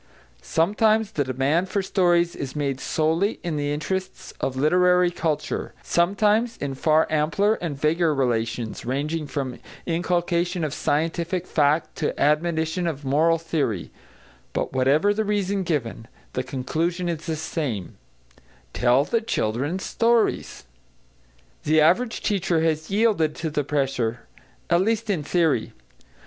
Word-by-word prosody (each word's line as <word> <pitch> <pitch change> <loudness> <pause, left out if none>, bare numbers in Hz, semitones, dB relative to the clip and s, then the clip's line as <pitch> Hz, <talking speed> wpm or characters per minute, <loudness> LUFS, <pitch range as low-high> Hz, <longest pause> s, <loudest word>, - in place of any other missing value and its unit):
Sometimes 215 - +2
the 150 -9 0
demand 140 +8 0
for 200 - -1
stories 175 -2 +2
is 135 0 -6
made 140 -3 -1
solely 165 +9 0
in 170 -3 -2
the 145 -1 -1
interests 185 +6 -4
of 130 - -2
literary 180 +5 +3
culture, 160 -4 -2
sometimes 210 +6 +2
in 140 -1 -3
far 155 +4 +3
ampler 160 +7 +2
and 150 -6 -4
vaguer 160 +2 +2
relations, 115 -3 -1
ranging 150 +5 -2
from 135 -3 -4 0.3
inculcation 175 0 0
of 150 -2 -2
scientific 165 +4 -1
fact 150 0 +1
to 150 - -2
admonition 160 +3 +1
of 145 -3 -4
moral 160 +5 +3
theory; 145 - -2 0.6
but - - -2
whatever 140 +10 +3
the 220 +1 0
reason 200 -1 0
given, 130 -10 -3 0.3
the 130 - -1
conclusion 160 +8 -2
is 170 0 -4
the 160 - -1
same: 145 - -4 0.8
tell 125 +4 +3
the 230 +4 0
children 145 - -1
stories. 230 - 0 1.0
The 155 +1 +3
average 185 +10 +3
teacher 180 -5 +1
has 160 -1 0
yielded 200 -7 +2
to 160 -1 -4
the 145 0 0
pressure, 135 -5 -1 0.5
at 170 +1 +3
least 220 +1 0
in 175 -6 -1
theory. 155 -5 +1
160 Hz, 130 wpm, -24 LUFS, 145-180 Hz, 1.0 s, literary